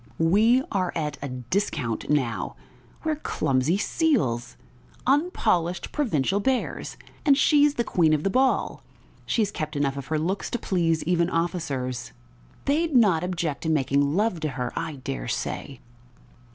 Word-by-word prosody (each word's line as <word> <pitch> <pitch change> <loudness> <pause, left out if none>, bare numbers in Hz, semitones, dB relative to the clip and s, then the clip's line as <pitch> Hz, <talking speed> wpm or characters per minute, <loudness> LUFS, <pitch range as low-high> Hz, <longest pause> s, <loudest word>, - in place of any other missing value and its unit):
"We 220 +10 +4
are 185 -3 0
at 150 -4 -2
a 140 - -4
discount 125 - -2
now.... 135 -6 0 0.5
We're 315 -2 0
clumsy 135 - 0
seals, 195 - 0 0.5
unpolished 245 - +1
provincial 200 - +1
bears, 255 +4 -1 0.3
and 280 -3 +5
she's 295 -1 +4
the 235 - +1
queen 170 -7 +2
of 155 -1 +1
the 195 - +1
ball! 260 +4 +1 0.5
She 225 - +2
has 205 - -2
kept 155 -4 -4
enough 140 -1 0
of 135 -1 -6
her 155 - 0
looks 180 +6 -2
to 240 - -1
please 170 -7 0
even 170 0 +1
officers... 140 - -2 0.5
They'd 310 +1 +1
not 200 -9 +5
object 170 -5 -2
to 160 - -2
making 140 -1 +2
love 205 -3 +1
to 155 -1 -2
her, 125 -2 -4
I 165 -2 -3
dare 65 - -5
say!" 135 -3 -4
165 Hz, 150 wpm, -25 LUFS, 140-220 Hz, 0.5 s, and